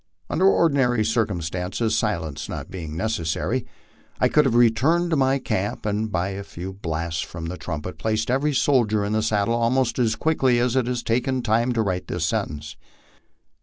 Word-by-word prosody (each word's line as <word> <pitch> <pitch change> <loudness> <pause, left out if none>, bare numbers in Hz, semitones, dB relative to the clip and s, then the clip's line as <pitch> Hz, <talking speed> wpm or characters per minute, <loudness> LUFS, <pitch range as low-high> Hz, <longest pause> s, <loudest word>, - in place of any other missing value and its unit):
Under 185 +4 +3
ordinary 135 - +3
circumstances, 100 -1 -1
silence 85 -9 -2
not - - -6
being 80 -4 -6
necessary, 110 +4 -1 0.5
I - - +3
could 150 -1 +4
have 125 -3 +1
returned 135 +10 +3
to - - +3
my 135 -1 +3
camp, 105 -7 -3
and 105 +1 -1
by 90 0 0
a 100 +1 -5
few 95 0 -7
blasts 80 -3 -3
from 80 +2 -6
the 85 +2 -4
trumpet 80 +1 -6
placed 110 +1 0
every 140 +3 +1
soldier 115 -7 +2
in 105 - -2
his 110 0 +1
saddle 105 +1 +1
almost 120 +1 +1
as 115 -3 +2
quickly 135 -5 +2
as 120 +1 +1
it 130 -2 +2
has 125 -1 -2
taken 125 +2 0
time 115 +2 +2
to 115 -2 +1
write 90 -3 -2
this 90 -2 -2
sentence. 75 -1 -3
110 Hz, 175 wpm, -23 LUFS, 90-125 Hz, 0.5 s, could